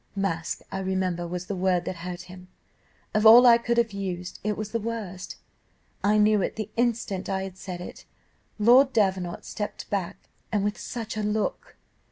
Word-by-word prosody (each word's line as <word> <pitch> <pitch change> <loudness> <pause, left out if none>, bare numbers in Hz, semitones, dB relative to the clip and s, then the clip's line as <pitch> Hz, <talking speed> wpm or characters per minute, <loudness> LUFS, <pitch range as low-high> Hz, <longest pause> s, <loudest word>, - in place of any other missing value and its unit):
Mask, 175 -5 -2
I 195 - -3
remember, 185 -2 -1
was 180 +1 -4
the 200 +1 -4
word 180 -1 +1
that 180 - -4
hurt 175 +1 -6
him. 180 0 -12 0.7
Of 215 0 +2
all 230 +3 +9
I 235 -1 +8
could 235 0 -1
have 230 -3 +2
used, 185 -2 -5
it 210 0 -1
was 215 -1 -5
the 230 - 0
worst: 210 -5 -5 0.7
I 210 +1 +4
knew 210 -1 +4
it - - -2
the 215 -2 -5
instant 230 -5 -1
I 190 -1 -1
had 190 -1 -7
said 180 -2 -7
it. - - -9 0.5
Lord 250 +5 +6
Davenant 190 -5 0
stepped 210 -1 -5
back, 195 -4 -3 0.2
and 205 -2 +1
with 205 +1 -2
such 225 -3 -5
a - - 0
look! 210 0 -2
200 Hz, 185 wpm, -26 LUFS, 185-220 Hz, 0.7 s, all